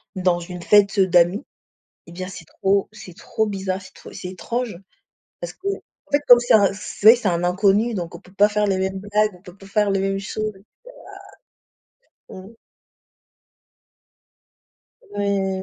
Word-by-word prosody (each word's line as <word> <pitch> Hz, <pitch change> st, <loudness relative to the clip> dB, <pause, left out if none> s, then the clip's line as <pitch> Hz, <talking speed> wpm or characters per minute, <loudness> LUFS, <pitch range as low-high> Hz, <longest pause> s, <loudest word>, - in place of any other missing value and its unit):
dans 180 Hz, -2 st, +1 dB
une 180 Hz, 0 st, -8 dB
fête 205 Hz, -1 st, +4 dB
d'amis, 180 Hz, +3 st, +3 dB, 0.6 s
eh 170 Hz, -, -13 dB
bien, 185 Hz, +1 st, -6 dB
c'est 180 Hz, -, -10 dB
trop 195 Hz, +4 st, 0 dB
c'est 195 Hz, -4 st, -12 dB
trop 220 Hz, +2 st, -2 dB
bizarre, 190 Hz, -2 st, -3 dB
c'est -, -, -14 dB
tr -, -, -13 dB
c'est 180 Hz, -, -7 dB
étrange 220 Hz, +3 st, -4 dB, 0.6 s
parce -, -, -5 dB
qu'en 395 Hz, +2 st, -5 dB, 0.4 s
fait, 285 Hz, -, +3 dB
comme 245 Hz, -1 st, +9 dB
c'est 240 Hz, -, +1 dB
un 200 Hz, -3 st, +5 dB
c'est 205 Hz, +1 st, -2 dB
vrai 225 Hz, -, +11 dB
que 240 Hz, -, -9 dB
c'est 205 Hz, -, -1 dB
un 170 Hz, 0 st, -1 dB
inconnu, 200 Hz, +5 st, +2 dB
donc 175 Hz, -4 st, -5 dB
on 170 Hz, -, -9 dB
peut 185 Hz, 0 st, -20 dB
pas 205 Hz, +1 st, +4 dB
faire 210 Hz, 0 st, 0 dB
les 195 Hz, -1 st, +1 dB
mêmes 190 Hz, 0 st, -2 dB
blagues, 210 Hz, +1 st, +1 dB
on 180 Hz, -, -19 dB
peut 185 Hz, -1 st, -14 dB
pas 195 Hz, -, -14 dB
faire 210 Hz, +1 st, +1 dB
les 195 Hz, -, +1 dB
mêmes 195 Hz, 0 st, -1 dB
choses. 215 Hz, +1 st, -4 dB, 1.8 s
Ouah! 185 Hz, -, -10 dB
Mmh. 225 Hz, -, -15 dB, 2.6 s
Ouais. 195 Hz, -2 st, -1 dB
195 Hz, 175 wpm, -22 LUFS, 185-210 Hz, 2.6 s, vrai